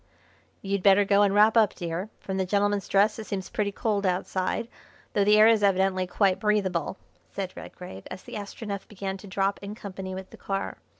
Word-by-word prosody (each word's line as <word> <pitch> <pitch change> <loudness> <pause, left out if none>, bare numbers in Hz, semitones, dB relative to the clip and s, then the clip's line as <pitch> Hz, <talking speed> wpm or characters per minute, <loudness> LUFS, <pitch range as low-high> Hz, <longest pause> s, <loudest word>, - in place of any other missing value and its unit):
"You'd 200 0 -1
better 200 +1 +5
go 200 +1 +4
and 200 -1 +4
wrap 210 +2 +5
up, 220 -4 +4
dear. 175 +4 -4
From 190 -1 -4
the 190 - 0
gentleman's 205 +1 +1
dress 205 +3 +3
it 220 - -7
seems 190 -2 -4
pretty 205 -1 -1
cold 205 0 -1
outside; 185 +3 -1 0.5
though 205 - +3
the 210 +1 +5
air 215 - +8
is 225 -2 +4
evidently 190 -2 +2
quite 195 0 +2
breathable," 195 -4 0 0.3
said 190 -2 -4
Redgrave, 140 - -10
as - - -8
the - - -11
Astronef 205 -1 -6
began 195 -1 -5
to 200 - -12
drop 195 +1 0
in 200 +1 -6
company 190 -3 -7
with 190 0 -8
the - - -12
car. 195 0 -4
200 Hz, 195 wpm, -27 LUFS, 190-205 Hz, 0.5 s, air